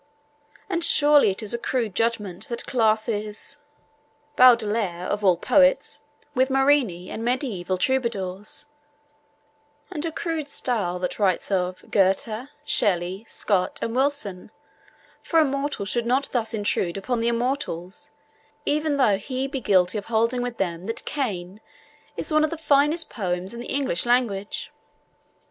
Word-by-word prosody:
And 345 -4 -1
surely 295 -6 +5
it 195 +4 -3
is 215 - -2
a 235 - -2
crude 235 -5 -2
judgment 220 -1 -2
that 235 -1 -3
classes 215 -2 -1 0.8
Baudelaire, 215 -7 +4
of 205 +2 -2
all 185 -3 +4
poets, 275 - +3 0.3
with 260 0 +2
Marini 270 -10 +2
and 225 - -5
mediaeval 230 -8 -1
troubadours, 210 -2 -1 1.3
and 310 -5 -4
a 330 - -1
crude 320 -2 -3
style 215 -10 -1
that 180 +3 -4
writes 195 -1 +1
of 185 -1 -1
'Goethe, 215 +6 +1 0.2
Shelley, 190 -3 +1
Scott, 185 -3 0
and 230 - -3
Wilson,' 265 -9 -1 0.7
for 330 - +2
a 315 - +5
mortal 275 -5 -2
should 235 +4 -2
not 260 +3 +1
thus 230 -2 -1
intrude 200 -4 -1
upon 235 +5 -2
the 230 - 0
immortals, 235 - -2 0.6
even 300 0 0
though 210 -8 +3
he 260 +5 -3
be 270 -1 -4
guilty 190 -1 +2
of 205 - -11
holding 230 +2 +1
with 245 -1 -4
them 175 0 -3
that 225 - -3
Cain 200 -8 -4 0.6
is - - -2
'one 310 0 +4
of 310 - +2
the 330 - -5
finest 300 +2 +3
poems 185 -2 -3
in 235 - -8
the 240 - -7
English 265 -8 0
language.' 230 -5 0
230 Hz, 145 wpm, -24 LUFS, 195-270 Hz, 1.3 s, surely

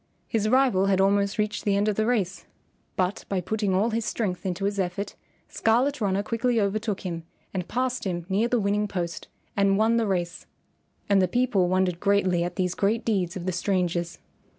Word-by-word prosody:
His 215 -1 0
rival 250 -7 +3
had 190 -1 +2
almost 200 +1 +2
reached 210 0 -1
the 200 -1 +2
end 205 +1 +1
of 210 - +1
the 220 +1 +1
race, 195 -6 -1 0.5
but 185 +2 -1
by 195 - 0
putting 205 +1 -1
all 215 +5 +2
his 225 +1 -1
strength 195 -4 -2
into 185 +2 -2
his 200 0 -1
effort, 190 +2 -2 0.3
Scarlet 250 +5 +1
Runner 200 -1 +1
quickly 230 +2 0
over 200 +1 +1
took 210 -3 -3
him 170 -4 -4 0.3
and 180 -2 -3
passed 255 0 -1
him 175 -3 -2
near 205 +4 +1
the 240 0 +1
winning 205 +1 +1
post 175 -4 -4 0.3
and 200 -1 +3
won 225 +2 +3
the 225 -2 +1
race. 175 -2 -2 0.6
And 200 -1 +4
the 185 - +3
people 215 -4 +2
wondered 185 -2 +1
greatly 190 -3 +2
at 175 0 -4
these 180 -1 0
great 215 +3 0
deeds 190 -4 0
of 180 -2 -5
the 185 - 0
strangers. 175 -2 -1
200 Hz, 195 wpm, -26 LUFS, 185-220 Hz, 0.6 s, And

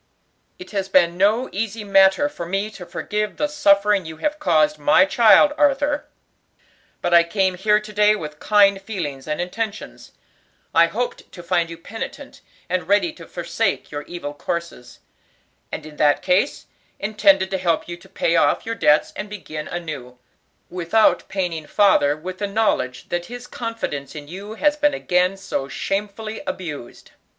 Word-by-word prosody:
"It 365 - -11
has 195 -2 -2
been 175 -2 +4
no 210 +7 +2
easy 220 +2 -3
matter 195 +6 +4
for 170 - -7
me 195 +4 -2
to 180 -4 -10
forgive 210 0 -3
the 295 - +1
suffering 205 -9 +3
you 160 -1 -9
have 300 - -2
caused 155 - +2
my 150 +5 +5
child, 235 +8 +5
Arthur; 290 0 +2 1.0
but 175 - 0
I 170 - +8
came 190 +2 0
here 210 +3 +2
to 215 0 -11
day 210 +1 +4
with 150 -6 -7
kind 200 -2 +4
feelings 160 -10 -5
and 150 0 -2
intentions. 210 +4 -5 0.6
I 165 +1 +6
hoped 245 +7 -4
to 175 - -11
find 170 0 0
you 165 - -8
penitent 210 +7 -8 0.3
and 185 0 -2
ready 205 - +2
to - - -13
forsake 175 +5 -2
your 145 -1 -4
evil 170 -5 -6
courses; 145 -5 -6 0.7
and 155 - -5
in 150 -1 -12
that 145 -1 +3
case, 185 +9 +1 0.3
intended 195 -2 +2
to 190 - -1
help 170 -3 0
you 175 - -5
to 175 - -18
pay 165 - 0
off 145 -3 +2
your 230 - -2
debts 150 -9 +3
and 205 +2 -6
begin 155 -7 -7
anew, 145 -8 -6 0.5
without 180 +5 +2
paining 175 -5 -3
father 150 -8 +3
with 185 +4 -7
the 205 - -1
knowledge 195 - -1
that 175 0 -3
his 245 0 -8
confidence 230 - -5
in 145 -1 -8
you 200 +6 -8
has 295 +4 +2
been 295 -1 +2
again 180 +2 +1
so 165 -8 -4
shamefully 210 +6 -4
abused. 165 - -7
190 Hz, 165 wpm, -21 LUFS, 165-215 Hz, 1.0 s, I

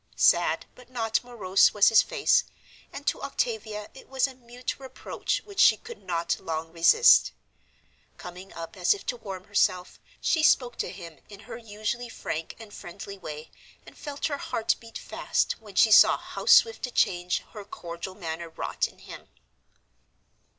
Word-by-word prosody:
Sad - - +3
but 250 -1 -17
not 225 -3 -1
morose 205 -7 +2
was 205 - +6
his 225 - +6
face, 485 - +2 0.5
and 285 - -9
to - - -1
Octavia 220 -6 -3
it 265 - -15
was 265 0 +1
a 270 - -6
mute 245 0 -7
reproach 265 -1 -4
which 400 -2 -9
she - - +7
could 465 +1 -11
not 170 -2 -2
long 165 0 -4
resist. 165 0 +6 0.9
Coming 180 +2 -10
up 165 +5 -8
as 185 - +3
if 400 - -12
to 245 - -3
warm 195 -5 -8
herself, 185 -3 0 0.2
she 320 - +1
spoke 250 -5 +3
to - - -2
him 170 -4 -10
in 205 -1 -12
her 220 - -9
usually 225 +2 -5
frank 160 -7 -5
and 220 -2 -12
friendly 200 +2 -9
way, 155 -2 -8 0.3
and - - -14
felt 290 0 -6
her 285 -3 -2
heart 225 - 0
beat 230 -1 -10
fast - - -1
when - - -14
she - - +5
saw - - +8
how - - -8
swift 455 - +5
a - - -9
change 175 -5 +1
her 210 -2 -9
cordial 175 -1 -8
manner 165 -3 -6
wrought 160 - -2
in - - -19
him. - - -12
210 Hz, 170 wpm, -27 LUFS, 180-245 Hz, 0.9 s, saw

